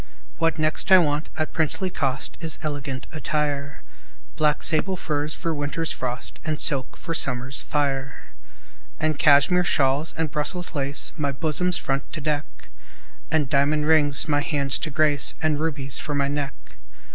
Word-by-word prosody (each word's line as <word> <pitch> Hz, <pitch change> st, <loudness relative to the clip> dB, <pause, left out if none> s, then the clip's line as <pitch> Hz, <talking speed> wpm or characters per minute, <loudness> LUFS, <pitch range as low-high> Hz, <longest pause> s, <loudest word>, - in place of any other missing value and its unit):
What 165 Hz, 0 st, +2 dB
next 155 Hz, +4 st, +1 dB
I 190 Hz, -, +11 dB
want, 150 Hz, -3 st, +1 dB
at 155 Hz, 0 st, -2 dB
princely 175 Hz, +4 st, 0 dB
cost, 135 Hz, -4 st, -2 dB
Is 165 Hz, -2 st, -3 dB
elegant 145 Hz, -3 st, -4 dB
attire: 150 Hz, -3 st, -2 dB, 0.5 s
Black 150 Hz, -1 st, +2 dB
sable 185 Hz, +4 st, +1 dB
furs 150 Hz, -2 st, -2 dB
for 165 Hz, -, -2 dB
winter's 150 Hz, +2 st, -2 dB
frost, 125 Hz, -1 st, -5 dB
And 155 Hz, -1 st, -2 dB
silks 135 Hz, -4 st, -1 dB
for 165 Hz, -, -4 dB
summer's 130 Hz, -3 st, +1 dB
fire, 135 Hz, -2 st, -1 dB, 0.8 s
And 155 Hz, -2 st, 0 dB
Cashmere 155 Hz, +4 st, +5 dB
shawls, 140 Hz, -1 st, +1 dB
and 160 Hz, -3 st, -1 dB
Brussels 175 Hz, +5 st, -2 dB
lace 140 Hz, -1 st, -2 dB
My 145 Hz, -3 st, 0 dB
bosom's 160 Hz, +5 st, 0 dB
front 135 Hz, 0 st, -2 dB
to -, -, -4 dB
deck, 150 Hz, 0 st, -1 dB, 0.8 s
And 155 Hz, -3 st, +1 dB
diamond 145 Hz, +3 st, +2 dB
rings 150 Hz, -2 st, +3 dB
my 145 Hz, -1 st, +2 dB
hands 140 Hz, -3 st, 0 dB
to 155 Hz, -, -3 dB
grace, 145 Hz, -1 st, +3 dB
And 155 Hz, -2 st, +1 dB
rubies 145 Hz, -4 st, -2 dB
for 150 Hz, -, -3 dB
my 140 Hz, -1 st, +1 dB
neck. 145 Hz, -1 st, -2 dB
150 Hz, 155 wpm, -24 LUFS, 140-155 Hz, 0.8 s, I